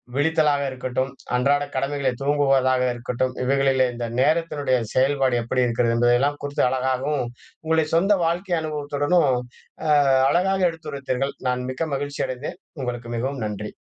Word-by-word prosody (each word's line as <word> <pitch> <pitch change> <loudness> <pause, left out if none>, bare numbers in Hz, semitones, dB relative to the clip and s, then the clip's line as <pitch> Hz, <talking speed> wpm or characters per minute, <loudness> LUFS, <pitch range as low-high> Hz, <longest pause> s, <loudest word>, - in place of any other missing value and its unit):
விழித்தலாக 150 -1 +2
இருக்கட்டும், 130 0 -2 0.3
அன்றாட 140 +3 +2
கடமைகளை 140 -1 0
தூங்குவதாக 135 -2 +2
இருக்கட்டும். 125 +1 -2
இவைகளிலே 135 0 +3
இந்த 120 0 -4 0.2
நேரத்தினுடைய 150 -4 +1 0.2
செயல்பாடு 135 -1 +2
எப்படி 125 +2 +1
இருக்கிறது? 115 0 +1
என்பதெல்லாம் 120 +5 +2
குறித்து 145 0 -1
அழகாகவும், 130 +1 -1 0.4
உங்களை 160 0 +2
சொந்த 195 +5 +4
வாழ்க்கை 175 +2 0
அனுபவத்துடனும். 145 +1 +1 0.6
அ - - +3 0.4
அழகாக 190 +2 +2
எடுத்துரைத்தீர்கள். 140 -4 -4
நான் 125 0 -2
மிக்க 160 +5 -3
மகிழ்ச்சி 145 +1 -4
அடைந்தேன். 130 +2 -6 0.2
உங்களுக்கு 120 -2 -4
மிகவும் 130 +1 -3
நன்றி. 105 0 -5
135 Hz, 125 wpm, -23 LUFS, 125-145 Hz, 0.6 s, சொந்த